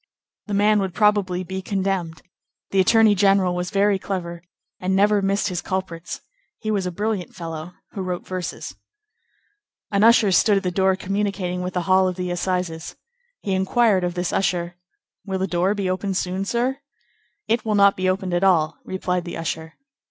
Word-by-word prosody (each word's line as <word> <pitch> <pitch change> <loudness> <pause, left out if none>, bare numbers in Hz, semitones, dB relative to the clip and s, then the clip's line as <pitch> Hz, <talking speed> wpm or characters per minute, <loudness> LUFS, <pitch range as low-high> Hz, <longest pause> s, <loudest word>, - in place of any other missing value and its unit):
The 205 - -2
man 210 +1 +4
would 190 -3 -2
probably 200 -4 +2
be 190 +1 -5
condemned; 190 -4 -2 0.5
the 195 - +2
attorney 220 +3 +5
general 195 -2 +3
was 180 0 -2
very 200 0 +2
clever, 175 -3 -4 0.4
and 185 +1 0
never 205 +1 +4
missed 200 +1 +1
his 180 -1 -3
culprits; 180 -3 -4 0.4
he 215 - -3
was 195 -3 0
a - - -2
brilliant 205 0 -3
fellow 165 0 -7 0.2
who 195 - -5
wrote 180 -1 -4
verses. 185 -2 -5 1.2
An 200 0 +2
usher 225 -3 +6
stood 200 +3 +4
at 195 - -1
the 180 - -1
door 190 +1 +2
communicating 190 -2 -2
with 180 0 -4
the 180 - 0
hall 185 +1 +4
of 185 - -2
the 180 -1 -3
Assizes. 175 -2 -2 0.5
He 195 - -1
inquired 190 +1 +2
of 175 0 -2
this 180 -1 -2
usher:— 175 -2 0 0.5
"Will 190 -2 -3
the 190 - 0
door 185 +2 +1
be 200 -2 -2
opened 185 +1 -1
soon, 185 +2 -2
sir?" 245 +5 -1 0.7
"It 225 0 +1
will 215 -1 0
not 200 -1 +5
be 185 0 0
opened 185 -1 -1
at 175 +2 +1
all," 165 -5 +3
replied 180 -1 -2
the 175 - -5
usher. 160 -1 -4
190 Hz, 180 wpm, -22 LUFS, 180-200 Hz, 1.2 s, usher